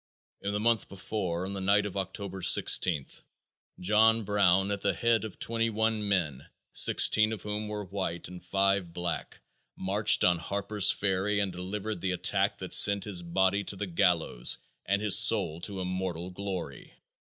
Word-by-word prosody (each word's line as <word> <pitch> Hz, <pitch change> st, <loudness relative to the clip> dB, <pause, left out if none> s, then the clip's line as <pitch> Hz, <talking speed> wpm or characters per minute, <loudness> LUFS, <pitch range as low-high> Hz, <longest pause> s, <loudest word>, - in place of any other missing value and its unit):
In 100 Hz, -, -4 dB
the 105 Hz, -, -3 dB
month 115 Hz, -1 st, 0 dB
before, 90 Hz, -2 st, -4 dB
on 100 Hz, -, -6 dB
the 100 Hz, -, -6 dB
night 100 Hz, +2 st, +2 dB
of 100 Hz, -, -7 dB
October 95 Hz, 0 st, -6 dB
16th, 80 Hz, -4 st, +3 dB, 0.6 s
John 110 Hz, +4 st, +2 dB
Brown, 100 Hz, -1 st, +1 dB
at 100 Hz, -1 st, -4 dB
the 100 Hz, -2 st, -1 dB
head 115 Hz, +3 st, 0 dB
of 110 Hz, -3 st, -8 dB
twenty 115 Hz, 0 st, -1 dB
one 110 Hz, -1 st, -2 dB
men, 75 Hz, -9 st, -2 dB, 0.3 s
sixteen 110 Hz, 0 st, +5 dB
of 110 Hz, -, -7 dB
whom 105 Hz, 0 st, -5 dB
were 105 Hz, 0 st, -6 dB
white 95 Hz, -3 st, -5 dB
and 90 Hz, 0 st, -12 dB
five 95 Hz, -1 st, -1 dB
black, 85 Hz, -1 st, -5 dB, 0.3 s
marched 100 Hz, +3 st, +1 dB
on 90 Hz, -1 st, +2 dB
Harper's 100 Hz, +3 st, +1 dB
Ferry 100 Hz, +1 st, 0 dB
and 100 Hz, -2 st, -1 dB
delivered 100 Hz, +2 st, -6 dB
the 95 Hz, -1 st, -2 dB
attack 90 Hz, -, -1 dB
that -, -, -5 dB
sent 100 Hz, -1 st, +5 dB
his 100 Hz, -4 st, -3 dB
body 95 Hz, +3 st, 0 dB
to 100 Hz, -, -6 dB
the 100 Hz, -, -5 dB
gallows 85 Hz, -8 st, +1 dB, 0.3 s
and 100 Hz, +2 st, 0 dB
his 105 Hz, -3 st, +7 dB
soul 85 Hz, -7 st, +4 dB
to 100 Hz, +1 st, -5 dB
immortal 90 Hz, -1 st, -5 dB
glory. 95 Hz, -1 st, -7 dB
100 Hz, 165 wpm, -28 LUFS, 90-105 Hz, 0.6 s, his